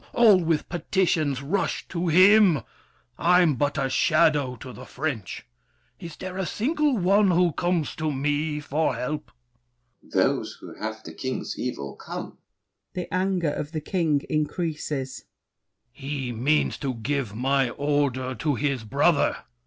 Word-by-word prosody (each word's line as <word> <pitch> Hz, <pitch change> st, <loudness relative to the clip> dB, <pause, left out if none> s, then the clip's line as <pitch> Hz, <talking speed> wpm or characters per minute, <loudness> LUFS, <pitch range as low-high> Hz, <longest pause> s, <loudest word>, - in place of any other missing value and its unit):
All 210 Hz, -6 st, +6 dB
with 160 Hz, -2 st, 0 dB
petitions 160 Hz, -5 st, 0 dB
rush 190 Hz, +7 st, -1 dB
To 175 Hz, 0 st, -2 dB
him! 185 Hz, -, +6 dB, 0.6 s
I'm 175 Hz, -2 st, +4 dB
but 145 Hz, +3 st, -1 dB
a 135 Hz, -2 st, +1 dB
shadow 150 Hz, -2 st, +2 dB
to 125 Hz, +2 st, -10 dB
the 125 Hz, -, -10 dB
French! 135 Hz, -7 st, -4 dB, 0.5 s
Is 165 Hz, -2 st, -8 dB
there 185 Hz, 0 st, -7 dB
a 190 Hz, -, -1 dB
single 295 Hz, +2 st, +1 dB
one 195 Hz, +2 st, +4 dB
who 175 Hz, -1 st, +3 dB
comes 175 Hz, -1 st, -1 dB
to 155 Hz, -1 st, -1 dB
me 150 Hz, +2 st, -1 dB
For 150 Hz, +2 st, 0 dB
help? 150 Hz, +4 st, -4 dB, 0.7 s
DUKE -, -, -22 dB
DE -, -, -2 dB
BELLEGARDE. -, -, +4 dB
Those -, -, -7 dB
who -, -, -10 dB
have 110 Hz, 0 st, -5 dB
the -, -, -9 dB
king's 130 Hz, -1 st, -4 dB
evil 70 Hz, -, -4 dB
come. -, -, -8 dB, 0.6 s
[The 180 Hz, -1 st, -5 dB
anger 185 Hz, -4 st, +1 dB
of 150 Hz, +2 st, -5 dB
The 155 Hz, -, -2 dB
King 155 Hz, -4 st, 0 dB
increases. 150 Hz, -4 st, -3 dB, 0.7 s
THE -, -, -24 dB
KING. 135 Hz, -, -6 dB
He 125 Hz, -2 st, -3 dB
means 135 Hz, +7 st, +1 dB
to 135 Hz, -3 st, -2 dB
give 120 Hz, -1 st, -2 dB
my 135 Hz, +2 st, +1 dB
order 140 Hz, -2 st, 0 dB
to 145 Hz, +2 st, -1 dB
his 135 Hz, -2 st, -1 dB
brother! 145 Hz, +6 st, +2 dB
150 Hz, 155 wpm, -25 LUFS, 135-175 Hz, 0.7 s, All